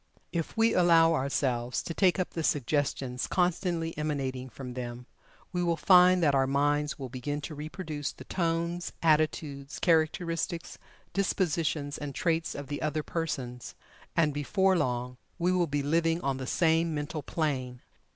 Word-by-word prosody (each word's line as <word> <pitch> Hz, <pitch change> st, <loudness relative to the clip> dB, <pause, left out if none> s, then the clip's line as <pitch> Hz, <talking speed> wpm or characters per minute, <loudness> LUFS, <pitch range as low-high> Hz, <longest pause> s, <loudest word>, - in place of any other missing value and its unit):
If 170 Hz, +5 st, -3 dB
we 225 Hz, 0 st, +4 dB
allow 165 Hz, -2 st, +5 dB
ourselves 130 Hz, -4 st, 0 dB
to 165 Hz, -, -4 dB
take 185 Hz, +1 st, +3 dB
up 185 Hz, -, -1 dB
the 165 Hz, -, -3 dB
suggestions 140 Hz, -3 st, 0 dB
constantly 175 Hz, -2 st, 0 dB
emanating 135 Hz, -4 st, -2 dB
from 125 Hz, +1 st, -8 dB
them, 120 Hz, 0 st, -6 dB, 0.5 s
we 180 Hz, -, 0 dB
will 170 Hz, -1 st, +1 dB
find 180 Hz, +1 st, +6 dB
that 145 Hz, -3 st, +4 dB
our 135 Hz, -1 st, +3 dB
minds 145 Hz, +2 st, +1 dB
will 135 Hz, -3 st, -5 dB
begin 130 Hz, +4 st, -4 dB
to 155 Hz, -, -6 dB
reproduce 150 Hz, 0 st, -5 dB
the -, -, -12 dB
tones, 170 Hz, 0 st, -1 dB
attitudes, 155 Hz, -2 st, +1 dB
characteristics, 165 Hz, 0 st, 0 dB, 0.3 s
dispositions 165 Hz, -6 st, 0 dB
and 145 Hz, -2 st, -5 dB
traits 165 Hz, -1 st, 0 dB
of 140 Hz, -, -5 dB
the 145 Hz, +1 st, -5 dB
other 155 Hz, 0 st, -1 dB
persons, 130 Hz, -8 st, -4 dB, 0.4 s
and 155 Hz, -3 st, +3 dB
before 190 Hz, +7 st, +2 dB
long 125 Hz, -4 st, -1 dB, 0.2 s
we 180 Hz, +1 st, +1 dB
will 180 Hz, -2 st, +2 dB
be 145 Hz, -1 st, -1 dB
living 165 Hz, +3 st, +2 dB
on 135 Hz, -3 st, -1 dB
the 130 Hz, -1 st, -5 dB
same 165 Hz, 0 st, +2 dB
mental 150 Hz, +1 st, -3 dB
plane. 130 Hz, -5 st, -2 dB
155 Hz, 150 wpm, -29 LUFS, 140-170 Hz, 0.5 s, find